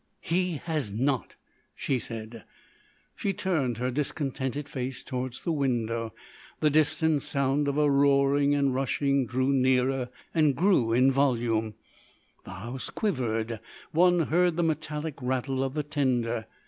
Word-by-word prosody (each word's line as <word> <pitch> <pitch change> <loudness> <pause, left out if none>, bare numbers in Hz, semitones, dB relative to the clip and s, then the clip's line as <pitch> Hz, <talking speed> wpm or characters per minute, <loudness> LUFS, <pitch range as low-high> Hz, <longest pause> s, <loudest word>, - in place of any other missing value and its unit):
"He 180 +1 0
has 155 -10 -1
not," 130 +4 -1 0.4
she 135 -3 -1
said. 115 0 -7 0.7
She 200 - -1
turned 150 - -1
her 125 +2 -1
discontented 140 0 -2
face 130 -2 -4
towards 125 -1 -4
the 170 - 0
window. 115 -6 -1 0.5
The 150 - +3
distant 155 0 +2
sound 140 +2 0
of 140 0 0
a 150 0 +4
roaring 140 0 +3
and 140 -2 +2
rushing 135 0 +1
drew 130 +3 +1
nearer 130 -1 +2 0.2
and 155 -4 +3
grew 175 - +3
in 125 +3 +4
volume; 115 -5 +1 0.7
the - - -10
house 115 +7 -6
quivered; 115 - -1 0.3
one 175 +1 +4
heard 175 +2 +2
the 170 - +1
metallic 155 -2 -3
rattle 130 +1 -1
of 135 +1 -3
the 150 - 0
tender. 125 -6 -1
135 Hz, 135 wpm, -28 LUFS, 125-150 Hz, 0.7 s, a